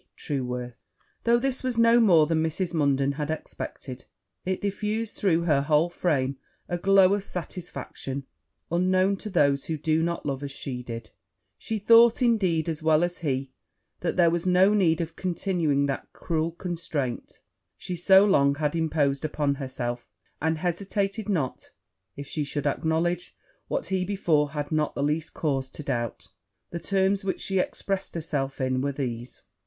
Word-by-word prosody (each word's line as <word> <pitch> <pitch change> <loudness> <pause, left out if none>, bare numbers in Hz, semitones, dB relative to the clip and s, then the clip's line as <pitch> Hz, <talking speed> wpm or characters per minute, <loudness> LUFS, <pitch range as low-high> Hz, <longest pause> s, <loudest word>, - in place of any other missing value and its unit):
TRUEWORTH.' 125 -4 -4 0.5
Though 235 0 +5
this 260 +1 -1
was 255 -2 -2
no 230 +1 +6
more 175 -9 +6
than 160 0 +1
Mrs. 170 +3 -1
Munden 140 -3 +2
had 150 -1 -3
expected, 130 -4 -6 0.4
it 185 0 -1
diffused 210 +2 -2
through 170 -4 +2
her 150 -5 +3
whole 155 +4 +2
frame 140 -7 0 0.3
a 175 - -2
glow 195 +1 +5
of 205 -1 -1
satisfaction 165 -6 -6 0.5
unknown 185 +3 +2
to 210 - -6
those 140 -7 +2
who 160 - -2
do 155 +2 +1
not 170 +1 -2
love 135 -2 -2
as 140 -1 -5
she 130 -2 -5
did: 115 -2 -7 0.5
she 220 - -3
thought, 230 +2 +6
indeed, 185 -10 +2
as 160 -2 -3
well 160 +1 +3
as 175 0 -2
he, 135 -4 -2 0.5
that 170 - -2
there 170 -2 +5
was 170 +1 -1
no 185 +3 +5
need 175 -6 +3
of 165 0 -5
continuing 170 -6 0
that 140 -1 -4
cruel 165 -1 -1
constraint 165 -7 -4 0.3
she 180 - -5
so 190 +3 +6
long 140 -8 +4
had 150 +1 -1
imposed 150 -4 +1
upon 150 -2 0
herself; 120 -2 -4 0.3
and 160 0 +1
hesitated 195 +5 -2
not 150 -10 -2 0.5
if 140 - -7
she 150 +2 -3
should 145 0 -3
acknowledge 165 +4 0 0.3
what - - -2
he 190 -1 0
before 170 -7 +1
had 145 0 -4
not 155 -1 0
the 140 - -1
least 155 +3 -1
cause 135 -4 -1
to 150 - -9
doubt. 120 -5 -3 0.4
The 170 - -4
terms 195 +1 +1
in 195 - -9
which 190 - -1
she 190 -1 0
expressed 195 0 -2
herself 145 -5 -2
were 130 +1 0
these. 125 -3 -5
160 Hz, 165 wpm, -26 LUFS, 140-185 Hz, 0.5 s, no